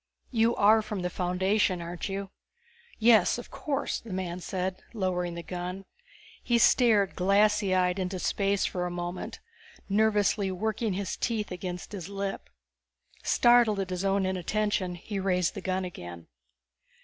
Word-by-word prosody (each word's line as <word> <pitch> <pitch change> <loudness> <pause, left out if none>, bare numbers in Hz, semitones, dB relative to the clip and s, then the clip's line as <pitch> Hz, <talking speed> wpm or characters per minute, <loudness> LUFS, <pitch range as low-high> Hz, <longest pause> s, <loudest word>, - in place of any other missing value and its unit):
You 230 -1 +3
are 215 +2 +5
from 210 -3 -4
the 180 - -2
Foundation, 185 +1 +1
aren't 170 +3 -5
you?" 195 0 -4 0.7
"Yes. 225 0 +5
Of 240 - -9
course," 285 -1 -2
the 230 - -11
man 185 -1 -3
said, 185 +1 -3
lowering 180 -4 -1
the 170 - -6
gun. 180 +2 -5 0.6
He 240 - +2
stared 220 -4 +4
glassy 200 +1 +3
eyed 180 +1 +2
into 185 0 -2
space 200 +2 0
for 180 -1 -2
a - - -3
moment, 175 +1 -5 0.5
nervously 205 -1 +2
working 215 +3 -1
his 190 0 -3
teeth 220 -4 -2
against 180 0 -5
his 195 -3 -6
lip. 200 0 -4 0.7
Startled 240 -4 +4
at 190 -1 -3
his 180 +1 -2
own 195 0 +2
inattention, 185 0 -1
he 195 +4 -5
raised 180 -3 +1
the - - -6
gun 185 0 -1
again. 85 - -8
195 Hz, 150 wpm, -28 LUFS, 180-210 Hz, 0.7 s, are